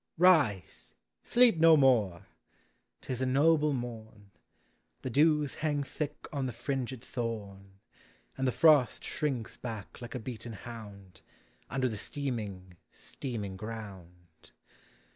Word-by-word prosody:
Rise! 150 - +3 0.3
Sleep 240 -8 +4
no 165 -1 +7
more! 115 - +3 0.8
'T - - -4
is 125 - -3
a 130 - +1
noble 150 +3 +4
morn. 110 -5 -6 0.7
The 130 - -3
dews 150 +1 +3
hang 145 -2 0
thick 150 +2 -5
on 135 -2 -1
the - - -3
fringed 130 0 -3
thorn. 100 -6 -6 0.6
And 130 0 -1
the - - +2
frost 150 -3 +4
shrinks 130 -7 -3
back 110 -1 -7
like 120 +1 -7
a - - -2
beaten 115 -1 -7
hound, 100 -3 -10 0.5
Under 130 -1 0
the 110 -3 -3
steaming, 105 - -5
steaming 105 -8 -6
ground. 95 -6 -10
120 Hz, 125 wpm, -30 LUFS, 105-140 Hz, 0.8 s, no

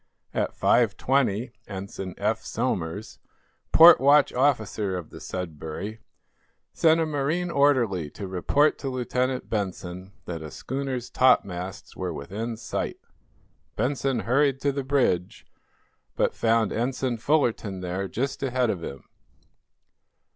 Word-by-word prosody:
At - - -2
5:20 125 -3 +2 0.2
Ensign 95 -1 -6
Eph 110 +2 -1
Somers, 105 -5 -3 0.5
port 165 -2 +9
watch 145 +1 +5
officer 110 -7 +1
of 85 -3 -8
the - - -10
"Sudbury," 90 +4 -6 0.7
sent 160 0 +4
a 165 - +2
marine 155 +4 -1
orderly 120 - +2
to 100 +6 -7
report 115 - +2
to 135 - -3
Lieutenant 130 0 -1
Benson 95 -2 -4
that 85 -2 -5
a 80 - -7
schooner's 130 - -4
topmasts 95 -8 +1
were - - -3
within 110 +10 -5
sight. - - -3 0.8
Benson 135 -2 0
hurried 135 +5 +2
to 140 - +2
the 140 0 -3
bridge, 130 -10 0 0.7
but - - +1
found 115 -2 +2
Ensign 125 +1 -1
Fullerton 115 -8 0
there 90 +2 -3
just 130 +8 -3
ahead 130 -3 +1
of 85 -4 -5
him. 70 -3 -7
115 Hz, 120 wpm, -26 LUFS, 95-135 Hz, 0.8 s, port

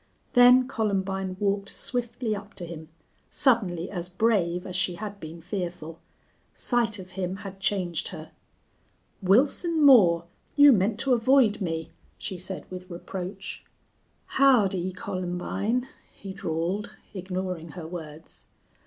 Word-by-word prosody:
Then 250 +1 +7
Columbine 195 -5 -1
walked 200 -1 0
swiftly 240 -2 -3
up 205 0 -10
to 175 - -4
him, 160 -2 -9 0.4
suddenly 195 - +1
as 175 -2 -5
brave 180 -3 +1
as 180 - -5
she 180 -1 0
had 205 +1 -7
been 165 0 -9
fearful. 175 -3 -5 0.6
Sight 235 -3 0
of 185 -1 -10
him 185 0 -3
had 195 0 -8
changed 185 -4 -1
her. 160 -3 -9 0.9
"Wilson 290 - +3
Moore, 175 -11 +7 0.3
you 285 -1 +8
meant 205 +1 +1
to 270 - +2
avoid 235 -3 +4
me," 165 -3 -3 0.3
she 185 - -5
said, 185 +1 -5
with 185 0 -8
reproach. 185 +2 -7 0.6
"Howdy, 200 -9 +3
Columbine!" 195 +6 -2 0.2
he 195 -1 -9
drawled, 185 +2 -3 0.2
ignoring 185 -4 -4
her 170 - -7
words. 160 -2 -10
190 Hz, 125 wpm, -26 LUFS, 175-220 Hz, 0.9 s, you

